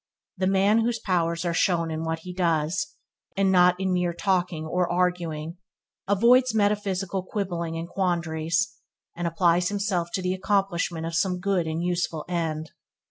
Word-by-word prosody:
The 185 Hz, -1 st, 0 dB
man 195 Hz, +3 st, +4 dB
whose 230 Hz, +1 st, +1 dB
powers 170 Hz, -4 st, 0 dB
are 170 Hz, -, 0 dB
shown 165 Hz, -1 st, +1 dB
in 160 Hz, 0 st, -3 dB
what 160 Hz, 0 st, -2 dB
he 180 Hz, -, -7 dB
does, 175 Hz, +2 st, 0 dB, 0.4 s
and 195 Hz, -1 st, +3 dB
not 180 Hz, -1 st, +5 dB
in 190 Hz, -1 st, 0 dB
mere 180 Hz, -1 st, 0 dB
talking 180 Hz, -3 st, 0 dB
are 180 Hz, +2 st, 0 dB
arguing, 175 Hz, -2 st, -1 dB, 0.5 s
avoids 235 Hz, +4 st, +4 dB
metaphysical 200 Hz, -3 st, 0 dB
quibbling 175 Hz, -4 st, -3 dB
and 165 Hz, +1 st, -4 dB
quandaries, 175 Hz, +2 st, -1 dB, 0.4 s
and 175 Hz, 0 st, -2 dB
applies 175 Hz, +1 st, +2 dB
himself 195 Hz, -4 st, -1 dB
to 185 Hz, -, -2 dB
the 180 Hz, 0 st, 0 dB
accomplishment 185 Hz, -4 st, 0 dB
of 165 Hz, -, -4 dB
some 180 Hz, +2 st, +1 dB
good 185 Hz, -3 st, 0 dB
and 160 Hz, +2 st, -2 dB
useful 175 Hz, -3 st, -1 dB
end. 160 Hz, -3 st, -2 dB
180 Hz, 155 wpm, -25 LUFS, 165-195 Hz, 0.5 s, not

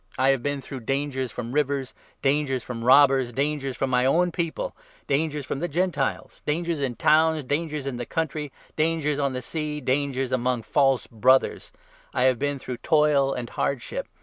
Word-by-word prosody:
I 130 Hz, +1 st, +3 dB
have 135 Hz, -2 st, +2 dB
been 145 Hz, +1 st, -2 dB
through 135 Hz, 0 st, -7 dB
dangers 130 Hz, 0 st, -2 dB
from 120 Hz, 0 st, -5 dB
rivers, 140 Hz, -2 st, 0 dB, 0.3 s
dangers 135 Hz, -3 st, +1 dB
from 115 Hz, -2 st, -6 dB
robbers, 135 Hz, -1 st, +5 dB
dangers 135 Hz, 0 st, -2 dB
from 135 Hz, -1 st, -1 dB
my 125 Hz, 0 st, +3 dB
own 175 Hz, +7 st, +3 dB
people, 170 Hz, -, -3 dB, 0.3 s
dangers 150 Hz, 0 st, 0 dB
from 135 Hz, -, -3 dB
the 175 Hz, -, -1 dB
Gentiles, 175 Hz, +3 st, -2 dB
dangers 165 Hz, +1 st, -1 dB
in 130 Hz, -4 st, -1 dB
towns, 160 Hz, +2 st, +3 dB
dangers 150 Hz, +1 st, -2 dB
in 135 Hz, -3 st, -3 dB
the 120 Hz, -, -4 dB
country, 155 Hz, -3 st, -2 dB, 0.2 s
dangers 155 Hz, -2 st, +1 dB
on 140 Hz, -2 st, 0 dB
the 125 Hz, 0 st, -4 dB
sea, 150 Hz, +1 st, -3 dB
dangers 135 Hz, -1 st, 0 dB
among 125 Hz, -2 st, 0 dB
false 135 Hz, -1 st, +2 dB
Brothers. 130 Hz, +4 st, +2 dB, 0.4 s
I -, -, +2 dB
have 130 Hz, -2 st, +4 dB
27 -, -, -18 dB
been 145 Hz, 0 st, -1 dB
through 125 Hz, -2 st, -6 dB
toil 150 Hz, -2 st, +3 dB
and 120 Hz, -1 st, -5 dB
hardship. 135 Hz, -4 st, -2 dB
140 Hz, 175 wpm, -25 LUFS, 130-150 Hz, 0.4 s, robbers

